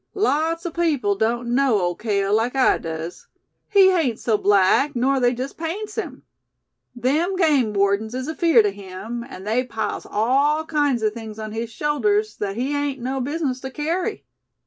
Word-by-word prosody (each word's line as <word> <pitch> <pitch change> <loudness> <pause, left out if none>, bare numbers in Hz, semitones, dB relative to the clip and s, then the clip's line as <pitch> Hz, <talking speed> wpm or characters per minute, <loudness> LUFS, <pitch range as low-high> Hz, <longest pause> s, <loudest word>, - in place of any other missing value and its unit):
"Lot's 330 -4 0
o' 345 - -2
people 305 -11 +1
doan't 235 +4 -1
know 250 -3 +3
Ole 175 -1 0
Cale 200 0 -1
like 225 +4 +1
I 265 - +3
does. 165 +1 -6 0.4
He 390 -2 +6
hain't 300 -11 +1
so 225 - 0
black 205 +8 +3
nor 265 +3 +2
they 245 -1 +4
jes' 255 +3 -4
paints 400 +7 -5
him. 445 - -5 0.7
Them 300 +10 0
game 295 - +3
wardens 200 +3 0
is 260 +1 -4
afeerd 315 -8 +4
o' 205 - +1
him, 200 +4 -7
and 220 -7 -10
they 230 +4 +1
piles 220 -4 -4
all 280 +8 +2
kinds 290 -7 0
o' 215 - +2
things 220 -1 -8
on 215 -1 -6
his 225 +1 -4
shoulders 215 -8 0
thet 200 -1 -4
he 255 +5 -2
hain't 285 -2 -1
no 260 +2 -2
business 280 -1 -2
to 265 - -6
kerry." 335 +10 -3
250 Hz, 175 wpm, -22 LUFS, 215-295 Hz, 0.7 s, He